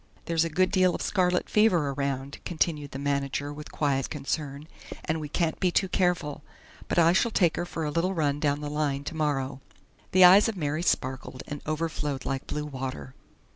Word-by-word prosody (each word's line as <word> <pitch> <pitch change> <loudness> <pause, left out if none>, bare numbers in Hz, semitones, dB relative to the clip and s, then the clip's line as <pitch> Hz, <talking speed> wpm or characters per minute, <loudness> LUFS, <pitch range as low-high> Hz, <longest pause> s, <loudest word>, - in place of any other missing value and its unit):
"There's 165 -1 +2
a 165 - -1
good 185 +4 +2
deal 185 -2 +3
of - - -5
scarlet 180 -2 +1
fever 180 -10 +3
around," 140 0 -3
continued 155 -4 -1
the 135 - -7
manager 140 0 -2
with 150 0 -9
quiet 140 -3 0
concern, 145 0 -4 0.4
"and 160 0 -1
we 150 - -6
can't 165 +1 -1
be 185 - +2
too 190 +2 +1
careful. 180 -6 0 0.5
But - - -2
I 170 0 +6
shall 235 - +3
take 175 -7 +2
her 175 - -3
for 165 - -4
a 150 - -2
little 180 +4 0
run 145 -3 0
down 145 -1 0
the 145 - -4
line 145 -2 -1
tomorrow." 140 -4 -2 0.5
The 185 0 +6
eyes 195 +5 +8
of 215 - -5
Mary 155 0 -1
sparkled 130 -5 -2
and 145 -1 -6
overflowed 155 -3 -2
like 135 -1 -3
blue 150 0 -3
water. 130 - -6
150 Hz, 190 wpm, -27 LUFS, 140-175 Hz, 0.5 s, eyes